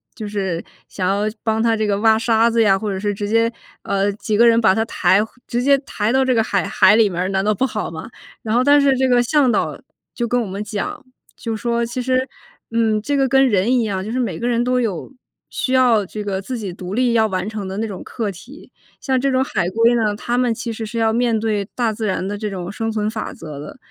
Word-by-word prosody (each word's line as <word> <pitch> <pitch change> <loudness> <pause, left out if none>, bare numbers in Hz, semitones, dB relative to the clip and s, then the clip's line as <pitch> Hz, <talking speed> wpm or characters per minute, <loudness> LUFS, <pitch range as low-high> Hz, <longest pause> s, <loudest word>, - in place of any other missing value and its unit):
就 215 -2 -6
是 190 -5 -2 0.3
想 185 -2 -2
要 200 +1 +1 0.2
帮 220 0 0
它 230 -1 +2
这 215 -1 0
个 200 0 0
挖 220 0 +4
沙 225 0 +3
子 230 0 +2
呀， 195 -2 +4
或 210 0 -3
者 190 - -3
是 205 0 -1
直 205 +1 -4
接， 230 +1 +3 0.3
呃， 200 +1 0
几 210 +1 -3
个 235 - +6
人 230 0 +5
把 190 -4 +4
它 225 - +1
抬 200 -3 +2 0.3
直 240 +1 -1
接 280 +1 +5
抬 210 +2 -1
到 265 0 +3
这 255 -2 +2
个 225 - +3
海 200 -4 0
海 190 +3 +5
里 215 -3 +4
面 175 0 -3
儿， 185 - -1
难 195 0 0
道 215 - +3
不 260 - +1
好 215 -5 -3
吗？ 160 +6 -8 0.3
然 215 - -2
后 245 - +4
但 285 +1 +5
是 275 -1 +4
这 260 0 +2
个 245 -1 +4
向 280 0 +3
导 - - -1 0.4
就 240 - -1
跟 245 +2 +1
我 230 - -3
们 195 +2 -5
讲， 210 +3 -5 0.3
就 225 -2 -4
说 235 +2 -1
其 240 +2 -4
实， 255 +1 0 0.4
嗯， 220 -2 +1
这 285 +7 -1
个 270 -1 +2
跟 270 0 +4
人 205 +4 +2
一 235 - +2
样， 195 -3 -2
就 220 - -5
是 255 - -1
每 245 - -2
个 240 - -2
人 235 0 +1
都 250 0 +1
有 215 - -3 0.4
需 260 - -2
要 240 -5 +4
这 210 +3 -6
个 195 -2 -3
自 250 +5 -5
己 200 -5 -5
独 185 +1 -7
立 245 +1 +2
要 220 -1 +3
完 185 0 -3
成 210 -3 -5
的 190 - -5
那 225 - -1
种 195 -3 -7
课 220 -4 -3
题， 250 - -14 0.3
像 260 -1 +1
这 275 - +1
种 260 0 +2
海 190 -9 -1
龟 230 +3 +3
呢， 215 -3 +1
它 240 +3 -2
们 250 -2 +2
其 230 +1 -5
实 220 0 -5
是 230 +2 -6
要 225 0 +2
面 235 -1 +1
对 210 -2 -1
大 235 -3 +1
自 215 0 -3
然 185 -1 -1
的 205 +1 -3
这 210 0 -3
种 185 -1 -5
生 225 +1 -3
存 215 -1 -1
法 220 - -5
则 150 -3 -9
的， 150 - -9
220 Hz, 280 characters per minute, -20 LUFS, 200-240 Hz, 0.4 s, 个